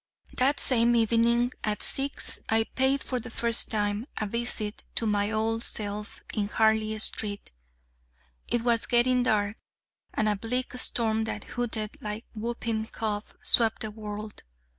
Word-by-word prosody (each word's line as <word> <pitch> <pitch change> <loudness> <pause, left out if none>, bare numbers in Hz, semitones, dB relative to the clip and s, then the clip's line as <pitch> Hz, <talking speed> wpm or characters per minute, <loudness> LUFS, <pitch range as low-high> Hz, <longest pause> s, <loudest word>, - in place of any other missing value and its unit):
That 275 +3 +1
same 240 -2 +6
evening 235 +2 +2
at 210 -1 -2
six 275 +1 +2
I 225 0 +3
paid, 265 +4 0
for 255 - -3
the 245 - -9
first 235 0 +4
time, 210 +2 -2
a 215 - -2
visit 215 -1 -2
to 230 - +3
my 205 -1 0
old 225 +1 -1
self 210 0 -3
in 205 -2 -1
Harley 220 0 +1
Street. 210 -1 0 1.0
It 240 -1 -1
was 235 -2 +3
getting 250 +1 +3
dark, 215 -3 0 0.6
and 215 - 0
a 210 - +1
bleak 250 +6 -3
storm 220 -3 +2
that - - -5
hooted 225 -3 -3
like 210 +1 -6
whooping 225 -1 -3
cough 215 -2 -5
swept 225 -2 +4
the 215 - -4
world. 210 0 -8
225 Hz, 145 wpm, -27 LUFS, 215-235 Hz, 1.0 s, same